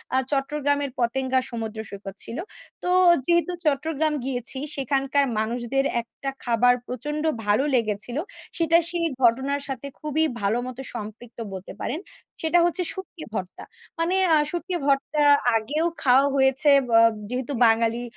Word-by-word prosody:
আ - - +4
চট্টগ্রামের 285 0 0
পতেঙ্গা 260 +2 +1
সমুদ্র 225 -2 -5
সৈকত 195 -1 -8
ছিল। 230 - -7 0.5
তো 360 - -1 0.4
যেহেতু 345 +2 +2
চট্টগ্রাম 305 +1 0
গিয়েছি। 250 -1 -1 0.2
সেখানকার 275 +1 +1
মানুষদের 240 +4 -1 0.2
একটা 255 +4 -7
খাবার 245 +1 +4
প্রচন্ড 295 +5 -4 0.2
ভালো 210 +5 +3
লেগেছিল। 230 +1 0 0.4
সেটা 330 0 +4
সেই 345 -1 -1 0.2
ঘটনার 265 +4 +2
সাথে 270 0 -5
খুবই 305 +1 0 0.2
ভালো 200 +3 +1
মতো 255 +1 -7
সম্পৃক্ত 225 +2 -8
বলতে 190 0 -8
পারেন। 300 - -3 0.4
সেটা 325 +2 +3
হচ্ছে 350 +1 0
শুটকি 375 -4 -9
ভর্তা। 185 -4 -5 0.4
মানে 335 +3 +1 0.2
আ - - +6
শুটকি 350 +2 -4
ভর্তা 280 +2 +1 0.3
আগেও 285 +9 0 0.2
খাওয়া 265 +1 +5
হয়েছে, 265 +2 +4 0.2
ব - - -10
আ - - +7 0.3
যেহেতু 255 +2 -3
বাঙালি 230 +1 +2
265 Hz, 140 wpm, -24 LUFS, 235-300 Hz, 0.5 s, আ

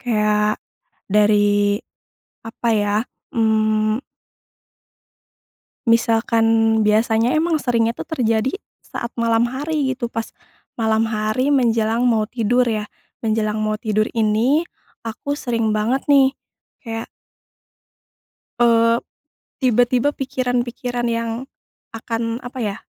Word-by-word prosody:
Kayak 210 -2 +1 0.5
dari 205 0 +3 0.7
apa 230 +1 -4
ya, 205 -1 +1 0.4
mmm 220 0 +2 1.9
misalkan 230 0 +2 0.4
biasanya 220 +2 +2
emang 320 -2 0
seringnya 230 -2 +1
tuh - - -6
terjadi 230 -4 +1 0.3
saat 235 - -6
malam 230 0 +2
hari 275 +1 -2
gitu, 240 -2 -4
pas 225 0 -3 0.5
malam 220 -1 +1
hari 220 +6 0
menjelang 230 -2 +2
mau 225 -3 +2
tidur 245 +2 +1
ya, 215 -2 -2 0.3
menjelang 215 -1 0
mau 215 0 -1
tidur 215 -1 0
ini 230 +9 +1 0.4
aku 285 +6 -4
sering 230 -3 -1
banget 215 +5 0
nih 275 -1 +5 0.5
kayak 225 -2 -5 1.5
eee, 230 -1 +4 0.6
tiba-tiba 250 +2 +2
pikiran-pikiran 245 -2 -2
yang 230 0 -1 0.7
akan 230 +1 -3
apa 250 +1 -7
ya, 205 -3 -2
230 Hz, 100 wpm, -20 LUFS, 215-245 Hz, 1.9 s, nih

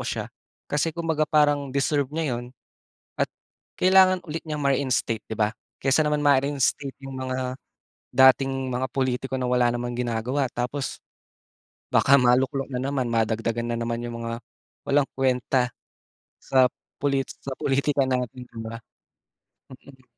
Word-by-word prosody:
siya - - -4 0.3
kasi 150 +2 -1
kung 170 - -3
baga 155 -2 +1
parang 145 -2 +3
deserve 140 +1 0
niya 145 -5 -2
yun, 125 +1 -12 0.6
at - - -1 0.5
kailangan 185 0 +6
ulit 160 0 -4
niyang 155 -2 -4
ma-reinstate 135 -5 0
'di 110 - -4
ba, 110 0 +1 0.2
kaysa 135 +3 +2
naman 150 0 +1
ma-reinstate 140 0 +2
yung 135 - -7
mga, 130 -1 -3 0.6
dating 130 +1 +5 0.2
mga 130 0 -2
pulitiko 130 0 -1
na 125 - -1
wala 125 -1 +3
namang 120 0 -3
ginagawa 125 +3 -1
tapos. 125 +3 -3 0.9
Baka 140 - +5
maluklok 130 +2 +2
na 125 - -2
naman 135 -2 -1
madagdagan 115 +1 0
na 115 - -1
naman 115 0 -2
yung 120 0 -6
mga, 115 0 -3 0.5
walang 140 0 +3
kwenta, 130 -1 +2 0.7
sa 130 -1 +4 0.3
pulit 140 -1 +1
sa 135 - -8
politika 140 0 +1
natin 125 -1 -2
'di 115 - -11
ba. 115 +1 -6 0.9
Mm. 130 0 -15
130 Hz, 140 wpm, -25 LUFS, 125-140 Hz, 0.9 s, kailangan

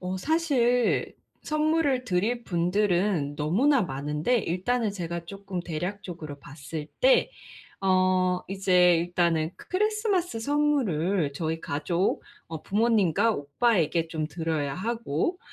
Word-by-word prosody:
어 185 +1 -3
사실 250 - +1 0.3
선물을 305 -4 +1
드릴 230 +3 -1
분들은 175 -4 0
너무나 230 - +2
많은데 150 - -1
일단은 215 +5 -1
제가 170 -3 -5
쪼끔 195 -1 -6
대략적으로 170 -3 -6
봤을 150 +2 -7
때 - - +4 0.5
어 185 -1 +2
이제 180 -2 +4
일단은 170 -2 0
크 - - -15
크리스마스 400 - 0
선물을 210 - +1
저희 160 +2 -3
가족 165 +6 -1 0.3
어 160 -2 -7
부모님과 215 -1 +2
오빠에게 165 0 +1
좀 155 -2 -3
드려야 160 -4 -2
하고 230 - -2
185 Hz, 255 characters per minute, -26 LUFS, 165-240 Hz, 0.5 s, 때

